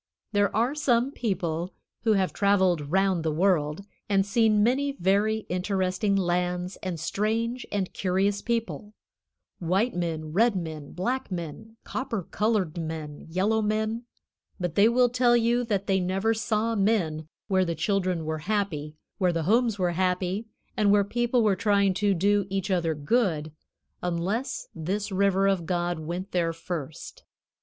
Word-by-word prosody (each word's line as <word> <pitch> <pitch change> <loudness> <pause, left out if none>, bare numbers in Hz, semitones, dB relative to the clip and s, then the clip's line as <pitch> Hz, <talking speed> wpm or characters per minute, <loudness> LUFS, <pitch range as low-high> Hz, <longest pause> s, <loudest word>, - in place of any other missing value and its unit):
There 205 -1 +1
are 235 +5 +2
some 260 -3 +2
people 175 - -2 0.3
who 220 - +5
have 190 -2 +1
traveled 185 -7 +2
round 190 0 +2
the 160 -1 0
world 160 0 +1 0.2
and 195 -1 +3
seen 215 0 +3
many 275 +5 +1
very 210 0 +1
interesting 185 +2 0
lands 180 0 0
and 180 -4 -4
strange 225 +8 -1
and 195 -3 -2
curious 195 +2 0
people 230 -2 -3 0.6
white 190 +8 +1
men, 160 -3 -3
red 225 +3 +3
men, 160 -5 -5
black 240 +7 -2
men, 180 +6 -6
copper 230 -7 -3
colored 195 -5 0
men, 155 -2 -6
yellow 200 +6 +1
men, 220 +2 -1 0.5
but 175 -3 -2
they 205 +5 +5
will 250 +1 +4
tell 240 0 +3
you 235 +1 +2
that 200 -3 -1
they 195 -2 +2
never 190 +5 +1
saw 225 0 0
men 190 -8 0 0.2
where 190 -2 +3
the 170 -2 -2
children 180 -1 0
were 155 0 -2
happy, 165 -8 -1 0.2
where 180 -2 +3
the 165 -1 -1
homes 225 +4 +2
were 180 -2 +1
happy, 185 +4 -1 0.3
and 210 -1 +2
where 205 0 +5
people 240 +3 +1
were 205 -3 +3
trying 200 -1 +2
to 200 +1 +1
do 200 +2 +2
each 195 +1 -2
other 170 -3 +1
good, 155 -1 0 0.5
unless 195 +9 -2
this 195 +6 -3
River 195 0 +2
of 190 -4 +1
God 175 -2 -1
went 175 +5 -5
there 170 -2 0
first. 165 -3 -7
195 Hz, 150 wpm, -27 LUFS, 175-220 Hz, 0.6 s, who